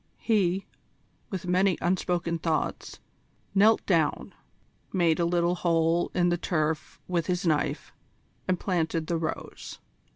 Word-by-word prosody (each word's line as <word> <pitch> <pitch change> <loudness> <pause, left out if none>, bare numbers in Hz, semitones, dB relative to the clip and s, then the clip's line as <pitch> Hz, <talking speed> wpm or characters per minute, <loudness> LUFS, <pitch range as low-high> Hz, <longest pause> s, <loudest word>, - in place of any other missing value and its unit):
He, 195 -4 +1 0.6
with 185 -3 -5
many 185 +1 +2
unspoken 175 -2 0
thoughts, 160 -1 -2 0.5
knelt 210 +3 +4
down, 165 -6 +1 0.6
made 170 -3 +2
a 170 - +2
little 175 0 +2
hole 170 -1 +1
in 175 -1 +3
the 175 -1 0
turf 155 -3 -1
with 170 -3 -1
his 180 0 -1
knife, 155 -3 0 0.5
and 185 -1 +1
planted 165 -3 -1
the 170 +1 -1
rose. 160 -1 -5
175 Hz, 125 wpm, -27 LUFS, 165-180 Hz, 0.6 s, knelt